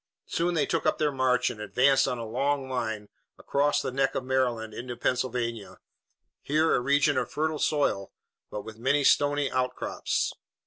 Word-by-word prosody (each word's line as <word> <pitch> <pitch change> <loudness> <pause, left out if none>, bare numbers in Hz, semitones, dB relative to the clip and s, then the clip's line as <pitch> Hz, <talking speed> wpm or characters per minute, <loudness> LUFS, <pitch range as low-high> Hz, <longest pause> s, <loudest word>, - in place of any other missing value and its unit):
Soon 175 +1 -1
they 150 -3 +2
took 165 - -1
up - - +2
their 150 -1 +1
march 130 -2 +2
and 105 - -9
advanced 135 +6 +3
on 125 -2 -1
a 115 - -5
long 135 +4 -1
line 110 -5 -3 0.3
across 145 +1 +1
the - - -2
neck 135 +1 0
of - - -1
Maryland 125 -4 0
into 120 +1 -6
Pennsylvania, 120 -3 -2 0.6
here 155 +3 +2
a - - +3
region 140 +1 +3
of 125 - -3
fertile 155 0 -1
soil, 140 -10 0 0.4
but 105 - -5
with 110 0 -10
many 140 +4 +2
stony 145 0 +3
outcrops. 125 0 -1
130 Hz, 170 wpm, -27 LUFS, 120-145 Hz, 0.6 s, advanced